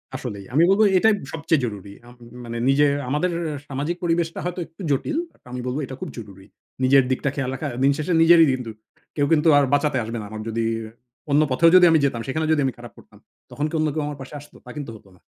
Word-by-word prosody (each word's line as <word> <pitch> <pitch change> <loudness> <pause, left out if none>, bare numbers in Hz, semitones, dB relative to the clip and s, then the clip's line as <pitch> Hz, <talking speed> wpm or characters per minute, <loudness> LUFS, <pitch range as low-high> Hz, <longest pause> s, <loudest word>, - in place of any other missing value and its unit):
আসলেই। 110 -8 -6
আমি 155 - +4
বলবো 205 +3 +4
এটাই 220 +4 +4 0.2
সবচেয়ে 160 -2 0
জরুরি। 100 -3 -7
আম 120 - -14 0.3
মানে 115 0 -5
নিজের 145 +1 +4 0.2
আমাদের 150 +6 0 0.4
সামাজিক 145 +5 -3
পরিবেশটা 165 -1 -1
হয়তো 180 +1 -4
একটু 165 +4 -16
জটিল। 300 - -1
বাট - - -31
আমি 125 0 -5
বলবো 130 +4 -2
এটা 130 - -8
খুব - - -5
জরুরি। 100 -4 -11 0.4
নিজের 135 +1 +5
দিকটা 140 +2 0
খেয়াল 135 -3 -2
রাখা। 145 +2 -4 0.2
দিনশেষে 145 +5 +1
নিজেরই 165 0 +7
কিন্তু 125 -3 -5 0.4
কেউ 145 - +1
কিন্তু 155 +1 +2
আর 145 - +4
বাঁচাতে 145 -2 +2
আসবে 115 +1 -5
না। - - -7
আমার 110 0 -7
যদি 115 +1 -2 0.7
অন্য 145 +2 +4
পথেও 165 +6 +5
যদি 180 -1 +8
আমি 160 - +4
যেতাম, 120 -4 -1
সেখানে 155 +4 -1
যদি 155 -2 +2
আমি 130 - -1
খারাপ 120 0 -11
করতাম, - - -18 0.3
তখন 145 - -3
কি - - -13
অন্য 155 - +1
কেউ 155 -1 -2
আমার 145 -1 -6
পাশে 135 - -10
আসতো? 145 - -17
তা - - -12
কিন্তু 145 -4 -6
হতো 105 -2 -17
না। - - -24
140 Hz, 225 wpm, -22 LUFS, 125-160 Hz, 0.7 s, যদি